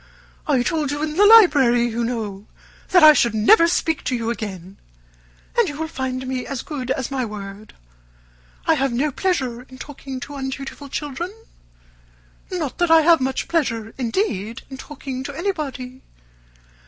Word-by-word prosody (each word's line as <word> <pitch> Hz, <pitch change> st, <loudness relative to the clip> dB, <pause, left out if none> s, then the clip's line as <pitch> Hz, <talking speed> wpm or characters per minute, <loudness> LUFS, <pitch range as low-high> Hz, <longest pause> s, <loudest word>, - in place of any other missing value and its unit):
I 270 Hz, -5 st, +2 dB
told 305 Hz, +1 st, -1 dB
you 290 Hz, +2 st, -2 dB
in 305 Hz, 0 st, -3 dB
the 410 Hz, +3 st, +6 dB
library, 285 Hz, -, +6 dB
you 235 Hz, 0 st, -2 dB
know, 215 Hz, -4 st, -4 dB, 0.4 s
that 360 Hz, -3 st, +5 dB
I 305 Hz, 0 st, +10 dB
should 235 Hz, -6 st, +2 dB
never 335 Hz, -, +6 dB
speak 325 Hz, -2 st, 0 dB
to 255 Hz, -, 0 dB
you 230 Hz, -1 st, -2 dB
again, 195 Hz, -4 st, -7 dB, 0.8 s
and 470 Hz, -6 st, +3 dB
you 290 Hz, -, -7 dB
will 320 Hz, -, -2 dB
find 260 Hz, -3 st, -4 dB
me 255 Hz, -1 st, -3 dB
as 275 Hz, -3 st, -5 dB
good 265 Hz, -5 st, -6 dB
as 265 Hz, 0 st, -2 dB
my 265 Hz, -2 st, -1 dB
word. 210 Hz, -1 st, -8 dB, 0.9 s
I 325 Hz, -, +4 dB
have 275 Hz, -3 st, 0 dB
no 275 Hz, +5 st, 0 dB
pleasure 260 Hz, -8 st, -1 dB
in 255 Hz, +1 st, -14 dB
talking 270 Hz, -1 st, -8 dB
to 290 Hz, -, -8 dB
undutiful 275 Hz, +1 st, -6 dB
children. 295 Hz, +6 st, -4 dB, 1.2 s
Not 330 Hz, -8 st, -4 dB
that 350 Hz, -1 st, +2 dB
I 325 Hz, 0 st, +7 dB
have 330 Hz, -1 st, +5 dB
much 260 Hz, 0 st, -1 dB
pleasure, 230 Hz, -9 st, -1 dB
indeed, 230 Hz, -, -2 dB
in 265 Hz, -, -7 dB
talking 265 Hz, -2 st, -7 dB
to 285 Hz, -, -6 dB
anybody. 275 Hz, -9 st, -4 dB
265 Hz, 165 wpm, -21 LUFS, 240-310 Hz, 1.2 s, I